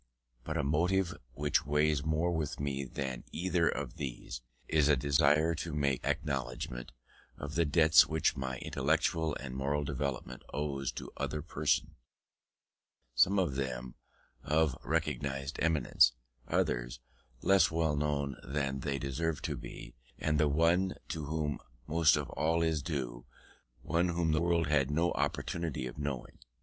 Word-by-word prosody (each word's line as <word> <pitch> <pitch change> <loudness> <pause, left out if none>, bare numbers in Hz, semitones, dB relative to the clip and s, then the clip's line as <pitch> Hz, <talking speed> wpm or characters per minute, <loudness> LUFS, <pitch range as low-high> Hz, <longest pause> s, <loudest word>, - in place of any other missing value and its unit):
But - - -3
a - - +1
motive 85 +5 +1 0.2
which 75 +2 +1
weighs 75 0 +2
more 80 +3 +1
with 80 -4 -2
me 70 -1 -2
than 65 -1 -4
either 90 -1 +1
of 85 - -4
these, 65 -4 -5 0.3
is 75 -2 +3
a 75 - +6
desire 75 +4 +3
to 80 -1 -4
make 70 -4 +1
acknowledgment 65 -6 -3 0.5
of 70 +1 -6
the 85 +1 +2
debts 80 +1 +6
which 80 -1 +1
my 65 -1 -3
intellectual 80 +4 0
and 65 -2 -6
moral 70 +2 0
development 70 -2 -3
owes 70 -2 -2
to - - -7
other 70 +2 -2
persons; 75 -3 0 1.2
some 80 +12 +4
of 90 -7 +2
them 65 -2 -3 0.5
of 75 -2 +2
recognised 70 0 -2
eminence, 75 -5 +4 0.3
others - - 0 0.4
less 95 -2 +5
known 75 -3 0
than 70 0 -2
they 70 0 -2
deserve 75 +4 -2
to - - -1
be, - - -9 0.2
and 75 -1 0
the 75 -1 +4
one 85 +5 +3
to 80 -2 -3
whom 75 -1 -2 0.3
most 80 +1 +4
of - - -2
all 80 +2 +1
is 80 -2 +1
due, 65 -6 -4 0.6
one 85 +3 +1
whom 85 -2 +1
the 80 +1 +2
world 85 -1 +2
had 70 -2 +2
no 80 +4 +2
opportunity 80 -6 -2
of 60 +3 -7
knowing. 70 -4 -4
75 Hz, 145 wpm, -32 LUFS, 70-80 Hz, 1.2 s, a